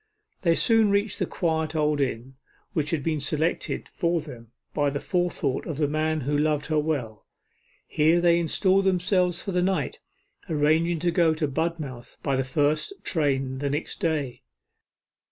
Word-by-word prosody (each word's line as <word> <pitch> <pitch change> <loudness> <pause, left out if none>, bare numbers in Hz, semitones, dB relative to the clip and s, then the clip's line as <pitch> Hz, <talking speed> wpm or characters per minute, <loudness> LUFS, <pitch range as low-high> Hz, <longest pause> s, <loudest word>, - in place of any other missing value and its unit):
They 170 -2 +3
soon 225 +1 +4
reached 200 +1 +1
the - - 0
quiet 160 -3 -1
old 150 -1 +1
inn, 130 -1 -2 0.4
which 150 -2 -1
had 155 -4 -1
been 155 -1 0
selected 155 +4 -1
for 170 0 0
them 120 -7 -10 0.2
by 145 -1 +1
the 140 +1 -3
forethought 175 -7 -1
of 155 - -4
the 150 -1 +1
man 155 +1 0
who 145 +3 -1
loved 150 0 +1
her 155 -1 +1
well. 140 -9 -3 0.6
Here 160 +3 +3
they 170 0 +4
installed 190 +3 +2
themselves 180 -1 +2
for 195 - -3
the 180 -1 +1
night, 190 - -1 0.5
arranging 160 +2 +2
to 175 0 +2
go 165 -3 +3
to 155 -1 -1
Budmouth 145 -4 -4
by 140 -2 +1
the 135 - +1
first 145 - 0
train 135 -5 0
the 140 0 -1
next 145 +3 -3
day. 150 -8 -1
155 Hz, 165 wpm, -26 LUFS, 145-170 Hz, 0.6 s, soon